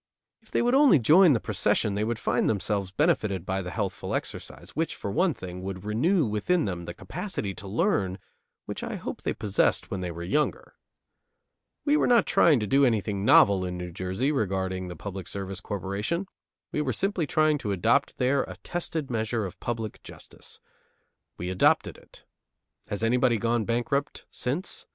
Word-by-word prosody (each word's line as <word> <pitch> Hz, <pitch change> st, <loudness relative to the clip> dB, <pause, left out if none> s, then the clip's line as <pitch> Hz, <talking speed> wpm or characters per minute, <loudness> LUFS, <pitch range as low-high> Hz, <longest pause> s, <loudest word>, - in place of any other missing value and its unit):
If -, -, -25 dB
they -, -, +1 dB
would 245 Hz, +1 st, +2 dB
only 275 Hz, -, +6 dB
join 155 Hz, -, +6 dB
the 115 Hz, -, +2 dB
procession 100 Hz, -, +1 dB
they 105 Hz, +1 st, -1 dB
would 115 Hz, +1 st, -1 dB
find -, -, +1 dB
themselves 100 Hz, -2 st, -1 dB
benefited 110 Hz, -, +1 dB
by 95 Hz, 0 st, -1 dB
the 90 Hz, -, -5 dB
healthful 80 Hz, -, -3 dB
exercise, -, -, -6 dB
which, 165 Hz, +2 st, -2 dB
for 100 Hz, -, -5 dB
one 170 Hz, -, +2 dB
thing, 90 Hz, 0 st, -7 dB
would 95 Hz, 0 st, -6 dB
renew 150 Hz, -, +2 dB
within 115 Hz, +12 st, +1 dB
them 90 Hz, -3 st, -4 dB
the 85 Hz, -, -7 dB
capacity 105 Hz, -, -4 dB
to 100 Hz, -, -9 dB
learn 100 Hz, -, 0 dB, 0.5 s
which -, -, -5 dB
I -, -, -4 dB
hope -, -, -6 dB
they -, -, -2 dB
possessed 100 Hz, -2 st, 0 dB
when 95 Hz, -, -3 dB
they 90 Hz, -, -3 dB
were 85 Hz, 0 st, -6 dB
younger. 150 Hz, +12 st, -1 dB, 1.1 s
We 295 Hz, 0 st, +4 dB
were -, -, +2 dB
not 235 Hz, -4 st, +5 dB
trying 150 Hz, -6 st, +4 dB
to -, -, 0 dB
do 135 Hz, +7 st, +3 dB
anything 105 Hz, -5 st, +1 dB
novel 100 Hz, -2 st, +6 dB
in 90 Hz, -1 st, -4 dB
New 90 Hz, 0 st, -6 dB
Jersey 95 Hz, -, -2 dB
in -, -, +1 dB
regulating 95 Hz, -3 st, -1 dB
the 90 Hz, -, -7 dB
Public 95 Hz, +1 st, -7 dB
Service 95 Hz, -1 st, -5 dB
Corporation; 100 Hz, -, -3 dB, 0.5 s
we 150 Hz, -, -1 dB
were 135 Hz, -4 st, -1 dB
simply 185 Hz, -, 0 dB
trying 155 Hz, -1 st, +2 dB
to 105 Hz, -, -3 dB
adopt 95 Hz, -3 st, +1 dB
there 135 Hz, +2 st, +2 dB
a 90 Hz, -, -9 dB
tested 165 Hz, -5 st, -3 dB
measure 110 Hz, -1 st, -1 dB
of 95 Hz, -1 st, -8 dB
public 115 Hz, -3 st, -4 dB
justice. -, -, -11 dB, 0.8 s
We 90 Hz, +1 st, -4 dB
adopted 95 Hz, -, +2 dB
it. -, -, -15 dB, 0.6 s
Has 105 Hz, +2 st, -4 dB
anybody 125 Hz, +1 st, +3 dB
gone 115 Hz, 0 st, 0 dB
bankrupt 120 Hz, +4 st, -1 dB
since? 145 Hz, +10 st, -3 dB
110 Hz, 180 wpm, -27 LUFS, 95-150 Hz, 1.1 s, only